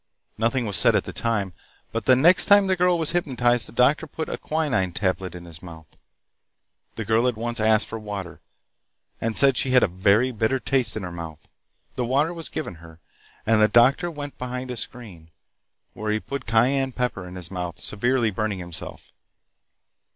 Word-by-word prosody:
Nothing 115 +2 0
was 100 -3 +3
said - - +5
at - - +2
the - - -8
time, 105 -5 -1 0.4
but 115 - -4
the 130 - +6
next 170 +8 +5
time 205 0 +6
the 190 -1 +1
girl 180 0 +2
was 160 -2 +1
hypnotized, 125 -8 +2
the - - -7
doctor 140 +7 +2
put 160 +2 -6
a - - -3
quinine 140 - -1
tablet 95 -2 -2
in 85 0 -10
his 85 -2 -11
mouth. 80 -4 -13 1.0
The 110 - -5
girl 110 +3 +2
at 125 - 0
once 120 +1 -2
asked 110 0 +3
for 115 - -7
water, 100 -4 -7 0.8
and 115 -1 -1
said 135 -3 +5
she 135 - 0
had 125 - +6
a - - +4
very 100 +8 +2
bitter 115 +3 0
taste 130 -1 +1
in 105 - -5
her 90 - -6
mouth. 80 -3 -9 0.5
The 125 - -1
water 140 +7 +1
was 165 -2 -6
given 125 - -6
her, 80 -1 -15 0.5
and 110 -1 +3
the 105 - +6
doctor 125 - +3
went 145 -3 -8
behind 125 0 -5
a 125 - -6
screen, 100 -11 -9 0.6
where 110 0 -3
he 110 - 0
put 140 +5 -7
cayenne 130 +4 +2
pepper 120 -8 -3
in 90 - -10
his 85 -2 -6
mouth, 90 -3 -5
severely 120 +1 0
burning 105 0 -2
himself. 85 -2 -8
115 Hz, 190 wpm, -23 LUFS, 95-130 Hz, 1.0 s, the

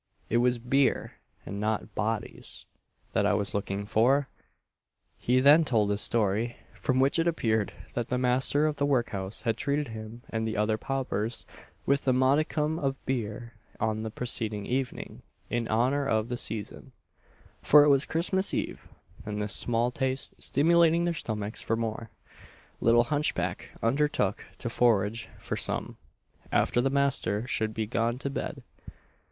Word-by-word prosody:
it 115 - +3
was 125 0 +3
beer, 130 +3 +1 0.3
and 100 - -5
not 105 0 -2
bodies, 110 0 -4 0.5
that - - +2
I 105 - +3
was 100 -1 -1
looking 100 0 -2
for!" 125 +6 +2 0.9
He 125 +1 +2
then 145 +5 +7
told 110 -8 +1
his 100 0 +1
story; 115 +1 +1 0.2
from 130 0 -1
which 135 +5 +3
it 165 - +2
appeared 110 -10 0 0.2
that 120 -1 -2
the 125 - 0
master 130 +4 +3
of 150 -1 -1
the 145 - +1
workhouse 110 -7 -1
had 115 -3 0
treated 145 +1 -1
him 110 +2 -8
and 110 0 -1
the 110 - -3
other 105 +1 +2
paupers 120 -4 -3 0.4
with 140 0 +1
a 130 - +5
modicum 150 +4 +1
of 135 -3 -1
beer 115 -2 -3 0.3
on 110 -1 -1
the 110 - -4
preceding 110 -3 -1
evening 130 +2 -3 0.3
in 120 -1 -1
honour 130 +6 +1
of 110 -1 0
the 125 - -2
season, 110 -4 -5 0.7
for 150 0 +7
it 150 - +4
was 140 0 +5
Christmas 190 +5 0
eve; - - -4 0.4
and 105 0 -4
this 105 0 -1
small 120 +1 +2
taste 130 +1 -1
stimulating 170 +2 +3
their 175 0 0
stomachs 110 -8 -3
for 115 - 0
more, 115 0 -4 0.7
little 120 +1 +4
hunchback 145 +4 -2
undertook 115 -5 +1
to - - -4
forage 115 -2 +1
for - - -4
some, - - -3 0.5
after 120 - +2
the 135 - +1
master 140 -6 0
should 110 -3 -1
be 110 - -1
gone 115 +3 -1
to 140 +1 -4
bed. - - -5
120 Hz, 155 wpm, -28 LUFS, 110-140 Hz, 0.9 s, then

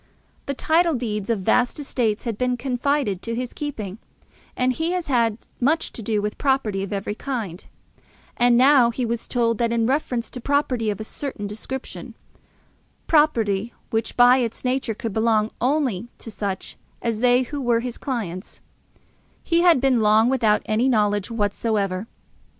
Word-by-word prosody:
The 280 - -2
title 325 +3 +2
deeds 215 -4 -3
of 225 -4 0
vast 245 +8 +2
estates 235 -7 -1
had 230 -3 -2
been 250 +2 0
confided 255 -5 -1
to 230 0 -3
his 245 +1 -4
keeping, 220 -9 -5 0.6
and 255 0 +2
he 325 +6 -1
had 360 -2 -2
had 230 -5 +1 0.2
much 305 +6 +1
to - - -6
do 210 -1 -1
with 210 0 -3
property 265 -8 +1
of 195 - -5
every 200 0 -2
kind; 215 -8 -5 0.7
and 240 0 +4
now 260 -2 +6
he 240 +1 -2
was 230 0 -3
told 230 -2 0
that, 235 -1 +1
in 230 -1 +1
reference 250 -2 -1
to 250 - -7
property 255 -5 0
of 205 - -3
a - - -4
certain 240 -2 -5
description, 220 +6 -6 0.9
property 235 -9 +2 0.2
which, 225 0 -2
by 245 +1 +7
its 240 -1 -3
nature, 250 -3 0
could 225 -2 -5
only 220 -1 +2
belong 250 -6 0
to 225 - -9
such 200 -2 -4 0.3
as 230 -2 -1
they 250 +1 +4
who 285 +3 -5
were 240 -2 +2
his 245 -1 -5
clients, 205 -8 -5 0.8
he 335 0 +2
had 345 -5 +5
been 260 -3 +2
long 215 +2 +4
without 225 -5 +2
any 225 +5 +1
knowledge 205 -4 +1
whatsoever. 205 -2 -1
235 Hz, 165 wpm, -23 LUFS, 215-260 Hz, 0.9 s, by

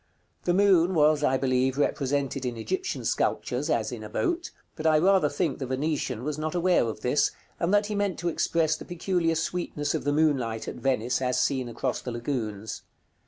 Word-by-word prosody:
The 175 - +2
moon 190 -2 +4
was, 150 -1 +4
I 130 -2 +3
believe, 130 0 +1
represented 140 -1 0
in 125 -2 -3
Egyptian 375 - -3
sculptures - - 0
as - - 0
in - - -6
a - - -7
boat; 350 -2 -1 0.3
but 160 0 -1
I 155 -1 +5
rather 185 -2 +4
think 160 -3 -1
the 135 - -3
Venetian 130 -3 -2
was 150 +1 -3
not 155 +2 -3
aware 175 -5 +3
of 110 -1 -5
this, 125 +5 +2 0.3
and 170 +1 +1
that 205 0 +4
he 210 - -3
meant 200 -3 0
to 175 - -3
express 160 -1 +1
the - - -9
peculiar 175 -1 0
sweetness 160 -3 -2
of - - -2
the 145 - +1
moonlight 135 -7 +1
at - - -5
Venice, 125 -1 0
as 125 -1 +1
seen 130 -2 0
across 120 +2 -2
the 125 - -5
lagoons. 115 -4 -4
150 Hz, 195 wpm, -27 LUFS, 130-175 Hz, 0.3 s, I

